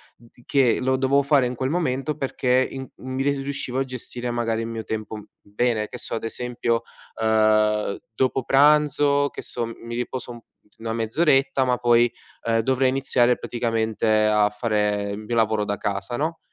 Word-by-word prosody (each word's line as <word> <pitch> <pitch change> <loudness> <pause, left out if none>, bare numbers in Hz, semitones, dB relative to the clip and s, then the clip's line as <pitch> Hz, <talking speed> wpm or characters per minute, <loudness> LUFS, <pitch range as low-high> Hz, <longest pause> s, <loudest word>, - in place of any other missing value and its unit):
d 115 0 -21 0.2
che 135 -5 +3
lo 130 +1 +1
dovevo 135 +2 +2
fare 140 -3 +3
in 125 - -4
quel 130 +2 -2
momento 150 -3 -1
perché 130 -2 +1
in 135 -1 -7
uhm, 130 0 -8
mi 135 - 0
ri 140 0 +1
riuscivo 135 -2 -3
a - - +2
gestire 125 -1 -6
magari 115 -1 -1
il 115 - -4
mio 115 -1 -5
tempo 110 0 -5
u 105 - -9 0.2
bene. 105 +1 -1
Che - - -8
so, 125 - -5
ad 115 - -3
esempio, 120 0 -2 0.4
ehm, 110 -2 +2 0.2
dopo 130 +1 0
pranzo 145 0 +4
che - - -7
so 120 -1 -4
mi 115 0 -8
riposo 125 0 -4
un 120 - -9 0.4
una 115 0 -3
mezz'oretta, 135 +3 +2
ma 125 -1 +1
poi, 120 0 +4 0.3
ehm, 115 0 +2
dovrei 130 +2 +2
iniziare 125 -2 +2
praticamente 115 -2 -1 0.2
a 105 -1 +3
fare 105 -2 -1
il 100 - -4
mio 110 +2 -4
lavoro 110 -2 +2
da 100 0 -2
casa, 100 +4 -3
no, 160 +2 -2
120 Hz, 180 wpm, -23 LUFS, 110-135 Hz, 0.4 s, pranzo